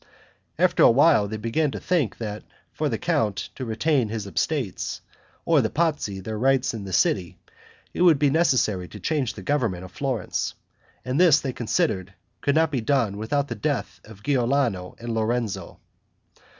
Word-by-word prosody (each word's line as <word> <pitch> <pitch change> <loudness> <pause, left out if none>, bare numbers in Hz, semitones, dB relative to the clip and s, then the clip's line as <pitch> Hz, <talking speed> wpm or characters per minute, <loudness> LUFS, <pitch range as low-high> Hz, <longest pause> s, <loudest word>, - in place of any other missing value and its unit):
After - - +3
a - - +8
while 135 -3 +5
they 110 +2 -4
began 115 +8 0
to - - -5
think 165 - 0
that 105 -2 -5 0.3
for - - -1
the - - -1
count 105 -3 -1
to 130 - -7
retain 120 +2 +1
his 110 -2 -4
estates, 115 - -2 0.4
or 160 -4 +4
the 110 - 0
Pazzi 150 - -1
their 110 +3 -5
rights 135 0 +2
in 105 -3 -6
the 95 - -7
city, 90 0 +1 0.6
it - - -3
would 170 -4 +6
be 140 0 +2
necessary 125 - +2
to - - -11
change 145 -7 -1
the 100 - -9
government 110 -8 0
of 90 - -12
Florence; 130 -4 -2 0.5
and 130 +4 -1
this 165 -5 +6
they 135 -2 -4
considered 105 - -1 0.3
could 140 - +1
not 160 -1 +3
be 130 -5 -1
done 115 -5 +1
without 140 +7 -1
the - - -3
death 145 -3 -3
of 105 -2 -14
Giuliano 125 -8 0
and 120 0 -5
Lorenzo. 115 -1 -2
120 Hz, 175 wpm, -24 LUFS, 105-145 Hz, 0.6 s, a